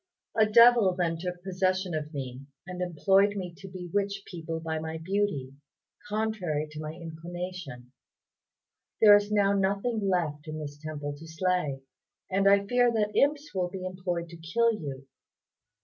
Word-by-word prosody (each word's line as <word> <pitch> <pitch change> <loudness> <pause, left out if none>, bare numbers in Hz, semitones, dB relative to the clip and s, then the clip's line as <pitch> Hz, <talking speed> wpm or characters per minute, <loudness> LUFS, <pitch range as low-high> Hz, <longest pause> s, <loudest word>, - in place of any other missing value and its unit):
A 220 -1 +5
devil 230 -3 +6
then 165 -2 -1
took 180 0 -5
possession 185 -1 0
of 155 -1 -3
me, 135 -3 -6 0.2
and 180 0 -6
employed 195 +4 +3
me 180 -3 -4
to 195 0 -10
bewitch 195 +2 -3
people 165 -2 -5
by 160 -1 -3
my 160 0 -4
beauty, 160 -6 -1 0.6
contrary 205 -8 -1
to 150 - -8
my 155 0 -5
inclination. 170 -6 -7 1.1
There 210 -2 +9
is 205 0 +1
now 200 -1 +3
nothing 200 +4 0
left 160 -5 -1
in 155 0 -5
this 145 -2 -6
temple 150 -2 -5
to 165 +2 -11
slay, 160 -5 -1 0.5
and 195 +1 +4
I 200 0 +4
fear 245 +2 +3
that 210 -2 0
imps 290 +1 +2
will 180 -2 0
be 185 0 -6
employed 180 -2 -3
to 170 - -10
kill 230 +9 +1
you." 140 -8 -6
180 Hz, 155 wpm, -28 LUFS, 160-200 Hz, 1.1 s, There